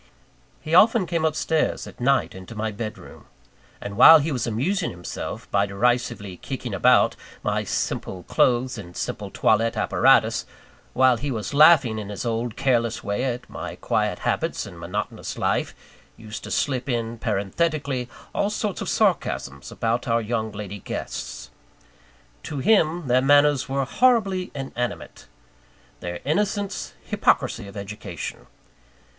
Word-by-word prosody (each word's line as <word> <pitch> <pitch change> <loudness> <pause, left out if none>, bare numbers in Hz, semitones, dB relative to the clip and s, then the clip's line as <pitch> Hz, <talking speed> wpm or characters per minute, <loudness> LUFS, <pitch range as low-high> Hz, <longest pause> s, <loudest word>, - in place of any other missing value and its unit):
He 155 - -5
often 215 +3 +6
came 165 -2 -1
up 155 -1 +1
stairs, 160 0 0
at - - -12
night, 135 +1 +2
into 95 +4 -10
my 110 0 -2
bed 110 +1 -5
room; - - -14 0.5
and 100 0 -6
while 160 +8 +10
he 155 +1 -1
was 125 -4 -2
amusing 165 - 0
himself 90 0 -6
by 100 0 +2
derisively 110 -2 -1
kicking - - -6
about - - +4 0.3
my - - 0
simple 90 -1 -3
clothes 125 +3 +1
and 90 -4 -10
simple - - -4
toilette 115 +1 +2
apparatus; - - +3 0.5
while 130 -1 +4
he 145 +6 -3
was 115 0 -4
laughing 140 -7 +6
in 105 -2 -6
his 105 +3 -5
old 115 0 -2
careless 120 -4 0
way 100 +5 -2
at 125 -1 -3
my - - -7
quiet - - -1
habits - - -1
and 85 - -11
monotonous 90 +5 -5
life, - - 0 0.4
used 110 -1 -8
to - - -7
slip 135 -2 -1
in, 115 -1 -2
parenthetically, 125 - -1 0.2
all 200 - +1
sorts 210 -2 -3
of - - -3
sarcasms 70 0 0
about 115 +1 -1
our 115 0 +2
young 110 -1 -2
lady 100 -1 -7
guests. - - -6 0.9
To 150 - -6
him, 165 +1 +2
their 125 +1 +4
manners 145 0 +4
were 135 0 0
horribly 200 - +2
inanimate; 125 -3 -5 0.7
their 85 0 -5
innocence, 200 +5 -1
hypocrisy 100 - +1
of 100 +1 -10
education. 100 -3 -7
120 Hz, 145 wpm, -24 LUFS, 105-150 Hz, 0.9 s, while